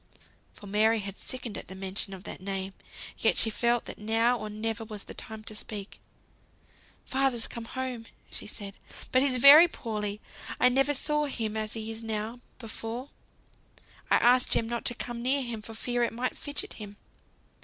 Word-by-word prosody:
For -, -, -13 dB
Mary 215 Hz, +3 st, +3 dB
had 200 Hz, -2 st, -5 dB
sickened 250 Hz, -4 st, -4 dB
at -, -, -11 dB
the 190 Hz, -, -8 dB
mention 195 Hz, +1 st, -2 dB
of 185 Hz, -, -12 dB
that -, -, -7 dB
name; 195 Hz, 0 st, -3 dB, 0.5 s
yet -, -, +3 dB
she 225 Hz, -, +5 dB
felt 235 Hz, +2 st, +1 dB
that -, -, -8 dB
now 225 Hz, +3 st, +3 dB
or 215 Hz, -3 st, -5 dB
never 225 Hz, +2 st, -2 dB
was 215 Hz, -2 st, -7 dB
the -, -, -9 dB
time 220 Hz, -1 st, -7 dB
to 215 Hz, -, -7 dB
speak. 210 Hz, -1 st, -5 dB, 1.1 s
"Father's 265 Hz, -3 st, +1 dB
come 235 Hz, -1 st, -6 dB
home!" 250 Hz, -2 st, -4 dB, 0.2 s
she -, -, -6 dB
said, 200 Hz, -2 st, -6 dB, 0.4 s
"but 255 Hz, -, +5 dB
he's 265 Hz, -2 st, +2 dB
very 285 Hz, +7 st, +10 dB
poorly; 210 Hz, -7 st, -4 dB, 0.4 s
I 250 Hz, -, +7 dB
never 270 Hz, +3 st, +2 dB
saw 300 Hz, +2 st, +1 dB
him 225 Hz, -6 st, -2 dB
as 215 Hz, 0 st, -2 dB
he 225 Hz, 0 st, -4 dB
is 225 Hz, 0 st, -6 dB
now, 220 Hz, +1 st, -3 dB, 0.2 s
before. 230 Hz, +3 st, -6 dB, 1.0 s
I -, -, +6 dB
asked 250 Hz, +1 st, +5 dB
Jem 225 Hz, -, +3 dB
not 235 Hz, 0 st, -3 dB
to 240 Hz, -, +1 dB
come 240 Hz, -1 st, -4 dB
near 265 Hz, +3 st, +2 dB
him 235 Hz, -3 st, -4 dB
for 225 Hz, +1 st, -9 dB
fear 245 Hz, +2 st, -1 dB
it 235 Hz, -, +1 dB
might 245 Hz, +2 st, -2 dB
fidget 290 Hz, -1 st, -5 dB
him." 205 Hz, -1 st, -8 dB
225 Hz, 185 wpm, -29 LUFS, 215-250 Hz, 1.1 s, very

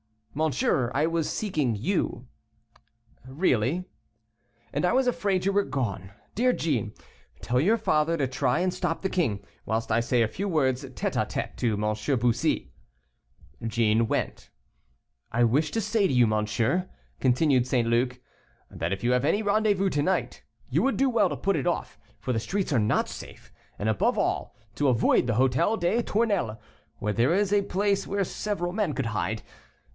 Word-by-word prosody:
"Monsieur, 140 Hz, -4 st, +1 dB
I 145 Hz, +3 st, +3 dB
was 165 Hz, -1 st, 0 dB
seeking 155 Hz, -, -1 dB
you." 125 Hz, -, -1 dB, 1.0 s
"Really." 135 Hz, -, +1 dB, 0.9 s
"And -, -, -1 dB
I -, -, +2 dB
was 260 Hz, 0 st, +3 dB
afraid 200 Hz, -6 st, 0 dB
you 195 Hz, -, +3 dB
were 200 Hz, 0 st, +2 dB
gone. 100 Hz, -8 st, -3 dB, 0.2 s
Dear 250 Hz, +3 st, +2 dB
Jeanne, 120 Hz, -, -1 dB, 0.5 s
tell 125 Hz, +1 st, 0 dB
your 205 Hz, -, +3 dB
father 165 Hz, -5 st, +1 dB
to 140 Hz, -3 st, 0 dB
try 130 Hz, +5 st, 0 dB
and 185 Hz, 0 st, 0 dB
stop 165 Hz, -3 st, -2 dB
the 190 Hz, -, -1 dB
king, 135 Hz, -, 0 dB, 0.2 s
whilst 110 Hz, +1 st, -2 dB
I 110 Hz, -, +3 dB
say 120 Hz, 0 st, +2 dB
a -, -, +1 dB
few 200 Hz, -, -4 dB
words 135 Hz, -6 st, +1 dB
tête 130 Hz, -1 st, -4 dB
à -, -, -3 dB
tête -, -, -4 dB
to 115 Hz, -3 st, +1 dB
M. 105 Hz, +5 st, -1 dB
Bussy." 120 Hz, 0 st, 0 dB, 0.9 s
Jeanne 115 Hz, 0 st, +2 dB
went. -, -, -3 dB, 0.8 s
"I 120 Hz, +1 st, +3 dB
wish 140 Hz, +7 st, +2 dB
to 225 Hz, -, -1 dB
say 215 Hz, -1 st, +1 dB
to -, -, -1 dB
you, 125 Hz, -1 st, +5 dB
monsieur," 110 Hz, -, 0 dB, 0.3 s
continued 130 Hz, -1 st, +3 dB
St. 120 Hz, -3 st, +1 dB
Luc, 125 Hz, +2 st, +1 dB, 0.5 s
"that 85 Hz, +4 st, -2 dB
if 100 Hz, -, -5 dB
you 120 Hz, -, +2 dB
have 125 Hz, +2 st, +2 dB
any 205 Hz, +8 st, +2 dB
rendezvous 205 Hz, -2 st, +2 dB
to 145 Hz, -, 0 dB
night, 185 Hz, +6 st, -1 dB, 0.3 s
you -, -, +2 dB
would 270 Hz, -, +1 dB
do 270 Hz, 0 st, +3 dB
well 235 Hz, -, +3 dB
to -, -, -4 dB
put 195 Hz, -3 st, 0 dB
it 135 Hz, -, -2 dB
off, -, -, -2 dB, 0.2 s
for -, -, -3 dB
the 110 Hz, -, 0 dB
streets 190 Hz, -, -2 dB
are 125 Hz, -, +3 dB
not 105 Hz, 0 st, +1 dB
safe, -, -, -10 dB, 0.3 s
and, 105 Hz, -, -3 dB
above 110 Hz, -, +1 dB
all, -, -, -1 dB, 0.2 s
to 145 Hz, -, +1 dB
avoid 125 Hz, 0 st, +3 dB
the 115 Hz, -, +1 dB
Hôtel 130 Hz, -, +2 dB
des 185 Hz, +7 st, +2 dB
Tournelles, 200 Hz, -, 0 dB, 0.4 s
where 105 Hz, 0 st, -2 dB
there 120 Hz, -, +2 dB
is 205 Hz, 0 st, +1 dB
a 205 Hz, -, +4 dB
place 200 Hz, +1 st, 0 dB
where 200 Hz, 0 st, 0 dB
several 185 Hz, -2 st, -3 dB
men 195 Hz, -5 st, -1 dB
could 130 Hz, -3 st, -2 dB
hide. 105 Hz, -1 st, -2 dB
140 Hz, 180 wpm, -27 LUFS, 115-195 Hz, 1.0 s, you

